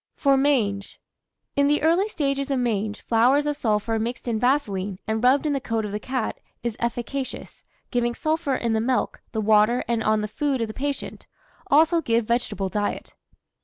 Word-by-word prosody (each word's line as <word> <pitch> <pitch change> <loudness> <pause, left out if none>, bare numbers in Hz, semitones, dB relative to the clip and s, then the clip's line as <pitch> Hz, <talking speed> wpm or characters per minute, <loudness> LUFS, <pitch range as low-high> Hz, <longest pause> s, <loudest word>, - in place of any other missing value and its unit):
FOR 275 -1 +3
MANGE. 235 -8 0 0.6
In 280 0 +3
the 295 0 +2
early 340 +6 +3
stages 275 -6 -1
of 275 - +1
mange, 215 -4 -1
flowers 250 +6 +3
of 295 0 0
sulphur 225 -3 0
mixed 240 +3 -4
in 225 -2 0
vaseline, 205 -7 0
and 220 +1 -2
rubbed 265 +4 +4
in 300 - +1
the 275 - -1
coat 225 -4 -2
of 205 - -5
the 210 - -3
cat, 255 0 -3 0.2
is 235 -2 -2
efficacious, 240 +3 -4 0.3
giving 240 -1 0
sulphur 310 -3 0
in 235 -2 -1
the 220 - +1
milk, 255 +2 -1
the 220 - -2
water, 215 +3 +4
and 230 -2 0
on 215 0 +2
the 210 - -2
food 275 +4 -1
of 230 - -1
the 215 - -7
patient; 285 +3 -4 0.4
also 320 +4 +4
give 230 -5 +1
vegetable 220 -4 -1
diet. 205 +1 -3
240 Hz, 185 wpm, -24 LUFS, 220-280 Hz, 0.6 s, rubbed